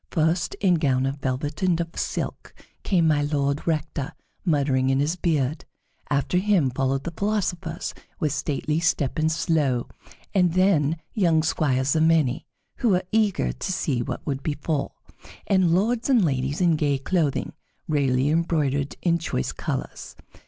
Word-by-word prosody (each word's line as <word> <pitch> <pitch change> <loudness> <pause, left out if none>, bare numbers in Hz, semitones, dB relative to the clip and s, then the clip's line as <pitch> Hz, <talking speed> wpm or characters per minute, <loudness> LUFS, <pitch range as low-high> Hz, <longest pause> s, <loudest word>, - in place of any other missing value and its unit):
First, 160 +1 0
in 180 -4 +2
gown 130 -4 +2
of 135 +1 -2
velvet 140 +2 -3
and 180 -3 +2
of 170 -1 -2
silk, - - -4 0.3
came 175 -4 +2
My 150 -2 +3
Lord 145 0 -1
Rector, 150 -4 -2 0.3
muttering 140 -6 +2
in 135 0 +2
his 150 +5 +1
beard; 155 -5 0 0.5
after 145 +5 +1
him 185 -9 +2
followed 135 +1 -1
the 170 - -4
philosophers, 185 -5 -2 0.3
with 150 -3 0
stately 150 +1 -1
step 155 -4 0
and 160 +1 +2
slow; 155 -7 +1 0.5
and 180 -4 +3
then 165 -5 +3 0.2
young 170 -7 +3
squires 140 -4 +1
a 155 - +3
many, 160 -6 +2 0.3
who 240 - +1
were 185 -2 +2
eager 210 - +2
to 65 - -4
see 150 -9 0
what - - -5
would 135 -2 -2
befall; 145 0 -2 0.5
and 190 -3 +3
lords 225 +8 +1
and 240 -8 +4
ladies 135 +2 -1
in 170 -3 +3
gay 145 -2 +1
clothing, 150 0 -1 0.3
rarely 135 -3 +1
embroidered 150 -4 0
in 170 -1 +2
choice 110 - -2
colors. - - -5
155 Hz, 150 wpm, -24 LUFS, 140-175 Hz, 0.5 s, and